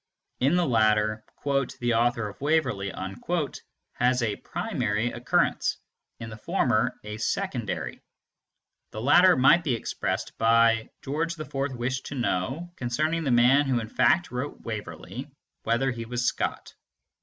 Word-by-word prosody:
In 135 +7 +3
the 180 -1 +3
latter, 110 -3 +2 0.2
"the 140 -4 0
author 115 -1 +1
of 105 - -11
Waverley" 145 -10 +1 1.0
has 125 0 +1
a 105 -3 0
primary 105 +4 -2
occurrence; 120 - +1 0.4
in 115 -1 -7
the 110 - -8
former, 120 - +1
a 105 0 -6
secondary. 105 - -3 0.9
The 110 - -5
latter 175 +8 +6
might 140 +7 +5
be 135 -7 +1
expressed 115 - -3
by 115 0 +4
"George 160 +4 -2
IV 155 - -8 0.2
wished 130 +2 -3
to - - -6
know, 130 - -2
concerning 155 +7 -1
the - - +1
man 125 +4 +5
who 125 -3 +2
in 110 -2 -6
fact 125 +10 +2
wrote 125 +4 -4
Waverley, 110 -3 -6 0.4
whether 125 +4 +1
he 115 -2 -5
was 120 +1 -2
Scott." - - -2
120 Hz, 135 wpm, -26 LUFS, 115-140 Hz, 1.0 s, latter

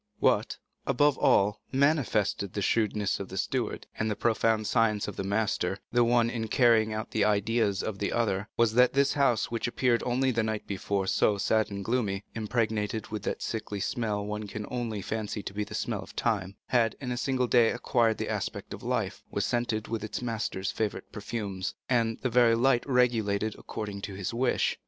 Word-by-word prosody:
What, - - +2 0.3
above 145 +2 +3
all, 105 +2 +3
manifested 130 - +1
the 100 - -2
shrewdness 105 -2 +1
of 100 - -6
the 95 - -7
steward, 120 +3 -2
and 110 - 0
the 105 - -1
profound 110 -1 +1
science 105 -1 +2
of - - -5
the - - -3
master, 100 -2 0
the 120 0 +4
one 120 0 +3
in 115 -1 -3
carrying 110 -2 +4
out 110 +1 -4
the 110 - +1
ideas 105 0 +1
of 105 -2 -4
the 100 - -1
other, 105 -3 0
was 115 -2 +3
that 125 +1 +5
this 140 0 +3
house 125 -6 +2
which 115 0 -1
appeared 120 0 +1
only 130 +2 +1
the 115 -1 +1
night 110 -1 -2
before 100 0 -2
so 100 +2 +2
sad 110 +1 +1
and 100 -1 -5
gloomy, 105 -5 0
impregnated 110 -1 -1
with 110 -1 -4
that - - -3
sickly 105 -2 -4
smell 105 -1 -1
one 105 0 -4
can 105 +1 -5
almost 110 -5 -4
fancy 105 -1 -3
to - - -6
be 105 +1 -1
the 105 - -7
smell 110 -5 -2
of - - -12
time, 100 -4 -1
had 115 -3 +2
in 125 -3 -4
a - - -1
single 130 0 0
day 120 -2 +4
acquired 115 -2 +1
the - - -3
aspect - - -4
of - - -8
life, - - -2
was - - -1
scented 120 -3 -1
with 115 -2 -3
its 110 - -4
master's 110 -5 -2
favorite 110 -2 -3
perfumes, 100 -3 -4
and 115 -3 +1
had - - -29
the 130 - +1
very 120 -1 +5
light 120 +1 +3
regulated 110 -5 +2
according 105 -2 -6
to 100 -1 -6
his 95 +2 -4
wish. 125 +2 +1
110 Hz, 200 wpm, -28 LUFS, 105-120 Hz, 0.3 s, that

